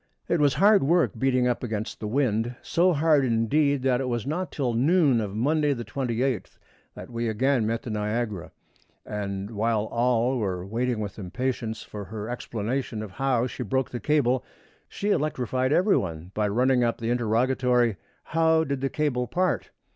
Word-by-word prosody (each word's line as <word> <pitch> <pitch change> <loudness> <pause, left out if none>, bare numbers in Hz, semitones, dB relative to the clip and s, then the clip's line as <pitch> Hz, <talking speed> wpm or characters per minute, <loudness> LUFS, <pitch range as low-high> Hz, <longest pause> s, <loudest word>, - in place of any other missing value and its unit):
It 170 - +1
was 145 -3 +3
hard 200 +6 +5
work 170 +5 +3
beating 130 -1 +2
up 125 - 0
against 110 -2 -4
the 105 - -4
wind; 120 -1 0
so 180 +2 +3
hard, 155 -2 +3
indeed, 130 +4 +2
that 130 -1 +2
it 130 - -2
was 120 -2 -2
not 170 +5 -3
till 130 -5 -1
the 115 - 0
noon 145 -4 +4
of 100 -2 -4
Monday, 145 +5 +2
the 120 -3 -6
28th, 125 0 -2 0.4
that - - -10
we 115 0 -2
again 120 +1 +1
met 115 +1 -2
the 120 - -5
Niagara; 105 -2 -2 0.5
and 100 -1 -4
while 110 0 0
all 120 +1 +1
were 95 -4 -2
waiting 115 +2 -1
with 100 0 -6
impatience 115 +3 -3
for 105 -1 -8
her 105 +2 -6
explanation 120 -1 -3
of 105 - -8
how 130 0 +1
she 125 - -6
broke 130 +3 -1
the 120 - -4
cable, 130 -4 +1 0.5
she 205 +1 -2
electrified 130 - 0
every 185 +6 +4
one 85 -1 -4
by 105 -1 0
running 125 +4 +2
up 115 -1 0
the 115 0 -2
interrogatory, 120 -1 +2 0.3
"How 160 0 +2
did 140 -3 -3
the 135 - 0
cable 130 -5 -1
part?" 180 +3 0
125 Hz, 175 wpm, -26 LUFS, 110-140 Hz, 0.5 s, hard